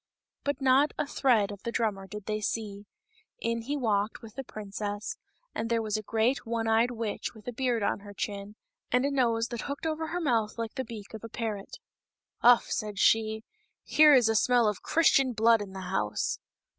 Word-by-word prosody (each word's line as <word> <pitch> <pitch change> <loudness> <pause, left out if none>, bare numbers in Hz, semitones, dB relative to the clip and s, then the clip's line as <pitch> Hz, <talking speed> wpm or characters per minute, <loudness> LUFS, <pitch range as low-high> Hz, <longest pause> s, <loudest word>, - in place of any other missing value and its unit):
But 285 -1 -1
not 270 +3 +4
a - - 0
thread 235 -8 +2
of 200 -1 -9
the 235 - -4
drummer 210 -5 -1
did 210 0 -8
they 215 0 -2
see; 205 -1 -3 0.5
in 230 0 -2
he 280 +6 -3
walked 215 -4 0
with 220 -2 -10
the 270 - -5
princess, 205 -2 -5 0.4
and 230 - -3
there 230 -1 +1
was 215 -1 -2
a 215 - -1
great 225 +5 0
one 230 -1 -2
eyed 225 +2 +3
witch 230 -1 -4
with 215 +1 -15
a - - -2
beard 245 -3 0
on - - 0
her 205 0 -11
chin, 200 +1 -5 0.4
and 250 +2 +3
a 285 - 0
nose 235 -4 +1
that 240 -2 -4
hooked 280 +2 -5
over 320 0 -1
her 350 - -2
mouth 230 -10 0
like 230 -1 -4
the 260 - -3
beak 225 -4 -9
of 220 - -8
a 230 - -7
parrot. 215 -3 -5 0.3
" - - -53
Uff 240 0 +6
!" - - -14
said 210 -2 -3
she, 220 +1 +3 0.2
" - - -50
here 300 -1 +6
is 245 -4 +5
a 225 - +2
smell 240 +1 +4
of 210 -3 -1
Christian 275 -5 +3
blood 225 0 +4
in 195 -2 -7
the 190 - -6
house." 105 - -1
225 Hz, 215 wpm, -29 LUFS, 210-250 Hz, 0.5 s, Uff